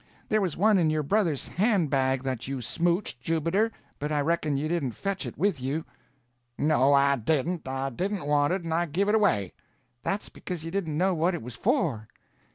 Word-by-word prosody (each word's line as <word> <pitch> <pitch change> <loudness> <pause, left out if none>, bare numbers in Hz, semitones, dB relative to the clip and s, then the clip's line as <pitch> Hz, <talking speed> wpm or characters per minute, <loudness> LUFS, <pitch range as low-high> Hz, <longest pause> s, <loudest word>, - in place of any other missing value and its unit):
There 215 0 +3
was 180 -6 -1
one 210 +1 +4
in 160 -3 +3
your 155 -1 0
brother's 170 -3 +1
hand 195 - +1
bag 130 -1 +1
that 130 -2 -3
you 135 -1 -3
smouched, 170 - -1
Jubiter, 165 - +1 0.3
but 150 +1 -3
I 150 - +1
reckon 155 -2 0
you 150 +3 -1
didn't 155 -7 -1
fetch 195 - -3
it - - -8
with 190 -9 +1
you." 145 +5 -2 0.7
"No, 140 -2 +3
I 140 0 +5
didn't. 155 +6 -1
I 135 +1 -2
didn't 190 - -2
want 145 +1 +2
it, 185 -1 -1
and 165 -1 -2
I 170 +1 +1
give 190 +7 0
it - - +3
away." 115 - +2 0.5
"That's 200 +9 -2
because 180 -4 -6
you 165 - -5
didn't 165 -6 -2
know 185 +3 +2
what 175 +2 +1
it 170 - -6
was 125 +1 -7
for." 155 - 0
160 Hz, 200 wpm, -27 LUFS, 135-185 Hz, 0.7 s, I